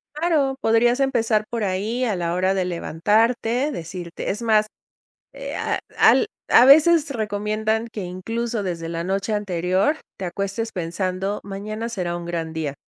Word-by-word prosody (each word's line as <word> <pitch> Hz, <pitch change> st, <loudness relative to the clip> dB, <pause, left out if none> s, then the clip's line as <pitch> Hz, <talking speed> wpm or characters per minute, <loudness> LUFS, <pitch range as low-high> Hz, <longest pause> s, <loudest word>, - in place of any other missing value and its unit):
Claro. 300 Hz, -4 st, +1 dB
Podrías 240 Hz, +3 st, +3 dB
empezar 230 Hz, -5 st, +2 dB
por 230 Hz, -3 st, -2 dB
ahí, 205 Hz, +6 st, -1 dB
a 220 Hz, -5 st, 0 dB
la 170 Hz, -1 st, -1 dB
hora 185 Hz, +1 st, +1 dB
de 190 Hz, -1 st, 0 dB
levantarte, 225 Hz, -, +1 dB
decirte 170 Hz, -, -6 dB
Es 210 Hz, +4 st, -3 dB
más, 215 Hz, -2 st, +3 dB, 0.7 s
eh, -, -, -6 dB
ah, -, -, -1 dB, 0.2 s
al 440 Hz, -, +5 dB, 0.2 s
a 245 Hz, -, +7 dB
veces, 310 Hz, +2 st, +6 dB
recomiendan 215 Hz, 0 st, -1 dB
que, 210 Hz, -, -5 dB
incluso, 225 Hz, +5 st, -3 dB
desde 170 Hz, -3 st, -4 dB
la 165 Hz, 0 st, -3 dB
noche 195 Hz, +4 st, -1 dB
anterior, 190 Hz, -, +1 dB, 0.2 s
te 190 Hz, -, -4 dB
acuestes 200 Hz, +5 st, -3 dB
pensando: 185 Hz, +3 st, -2 dB
"Mañana 215 Hz, +3 st, -5 dB
será 180 Hz, -6 st, -3 dB
un 170 Hz, -, -7 dB
gran 165 Hz, -2 st, -4 dB
día", 155 Hz, -3 st, -3 dB
210 Hz, 155 wpm, -22 LUFS, 180-230 Hz, 0.7 s, a